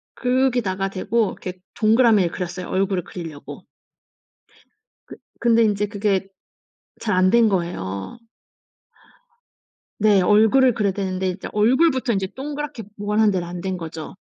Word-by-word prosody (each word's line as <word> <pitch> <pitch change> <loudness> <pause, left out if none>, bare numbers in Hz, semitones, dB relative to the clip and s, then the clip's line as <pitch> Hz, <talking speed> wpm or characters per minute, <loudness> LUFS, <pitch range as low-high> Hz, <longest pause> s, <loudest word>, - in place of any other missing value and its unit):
거기다가 245 -7 0
대고 215 +4 0
이렇게 185 0 -8 0.2
동그라미를 220 -5 +4
그렸어요. 180 0 -5
얼굴을 190 -1 0
그리려고. 160 -5 -9 1.4
그 - - -10 0.2
근데 230 -1 +4
이제 210 -1 +1
그게 200 -2 -1 0.7
잘 210 -3 -1
안 185 0 +4
된 235 -1 +5
거예요. 170 - -3 1.8
네 205 -2 +4
얼굴을 220 +7 +4
그려야 210 -3 0
되는데 190 -1 -2
이제 185 +2 -6
얼굴부터 260 +4 +2
인제 195 -2 -1
동그랗게 290 -3 -5
원하는 210 +1 +2
대로 180 -3 -2
안 175 0 -7
된 190 0 -3
거죠. 165 0 -8
205 Hz, 290 characters per minute, -22 LUFS, 185-230 Hz, 1.8 s, 된